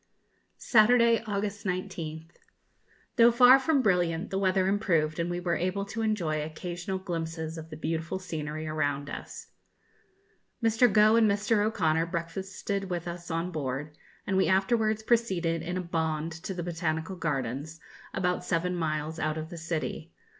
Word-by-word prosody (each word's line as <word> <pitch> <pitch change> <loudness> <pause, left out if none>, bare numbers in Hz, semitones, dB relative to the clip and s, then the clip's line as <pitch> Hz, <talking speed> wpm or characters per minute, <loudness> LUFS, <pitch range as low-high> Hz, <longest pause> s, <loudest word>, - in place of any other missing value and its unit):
Saturday, 235 0 +5
August 205 0 -2
19th. 170 -4 -4 0.9
Though 235 0 +8
far 250 +2 +7
from 275 -1 +2
brilliant, 175 -2 +1
the 195 - 0
weather 190 -1 +2
improved, 170 -6 +1
and 170 +1 0
we 175 0 -2
were 175 -1 0
able 185 +4 -1
to 225 +3 -5
enjoy 175 -9 0
occasional 175 +4 -4
glimpses 165 -3 -4
of 160 -1 -8
the 155 - -8
beautiful 165 +2 -2
scenery 155 -4 -5
around 145 -2 -1
us. - - -8 1.1
Mr. 225 +1 +4
Gough 215 +2 +6
and 220 -2 +5
Mr. 205 +1 +2
O'Conor 165 -6 +1
breakfasted 190 +4 -4
with 175 -1 -3
us 175 0 -6
on 165 +2 -2
board, 145 -1 -4 0.3
and 190 - 0
we 190 - +3
afterwards 215 +3 +2
proceeded 185 -9 +1
in 175 +2 -3
a - - -1
'bond' 160 -2 -2
to 165 +4 -6
the 175 - -3
Botanical 165 +1 -2
Gardens, 145 -1 -3 0.3
about 180 -1 -1
seven 180 +1 0
miles 155 -1 -2
out 155 0 -1
of 160 +2 -6
the 170 - -7
city. 165 -1 -4
175 Hz, 155 wpm, -28 LUFS, 160-200 Hz, 1.1 s, Though